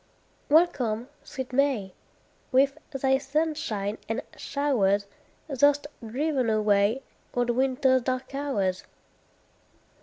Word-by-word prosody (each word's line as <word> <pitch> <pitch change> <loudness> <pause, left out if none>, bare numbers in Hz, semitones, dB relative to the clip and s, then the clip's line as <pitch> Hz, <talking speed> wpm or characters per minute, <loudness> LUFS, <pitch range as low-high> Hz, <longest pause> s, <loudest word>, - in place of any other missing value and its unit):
Welcome, 255 -7 +2
sweet 260 -3 -7
May! 250 -9 +1 0.6
With 275 +1 +4
thy 265 -1 +1
sunshine 280 -8 -2
and 225 - -2
showers 205 -9 +1 0.4
Thou'st 285 0 +3 0.2
driven 260 +2 0
away 215 +3 +2 0.3
Old 245 -1 +2
winter's 260 +1 +2
dark 255 +2 -3
hours. 210 -10 -1
260 Hz, 90 wpm, -27 LUFS, 220-280 Hz, 0.6 s, With